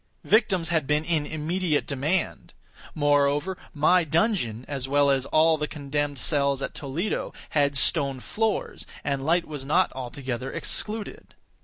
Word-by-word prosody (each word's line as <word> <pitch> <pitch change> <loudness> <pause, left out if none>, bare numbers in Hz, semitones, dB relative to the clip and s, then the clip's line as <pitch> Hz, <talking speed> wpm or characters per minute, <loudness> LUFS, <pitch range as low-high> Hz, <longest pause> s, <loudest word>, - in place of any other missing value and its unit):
Victims 195 -7 +2
had 160 -5 +1
been 150 +2 +1
in 155 -4 0
immediate 155 0 -1
demand. 150 +7 -2 0.4
Moreover, 145 +4 +2 0.2
my 170 +4 +4
dungeon, 155 - 0
as 135 -2 -4
well 140 0 +4
as 135 -1 0
all 160 0 +4
the 150 - -1
condemned 145 -1 -3
cells 140 0 +1
at - - -4
Toledo, 155 +9 -3 0.2
had 145 -2 +2
stone 140 -1 +2
floors, 220 - -2 0.2
and 140 -2 -1
light 170 +4 +2
was 150 -3 -6
not 155 +7 +2
altogether 130 0 -5
excluded. 215 0 -4
145 Hz, 140 wpm, -26 LUFS, 140-170 Hz, 0.4 s, my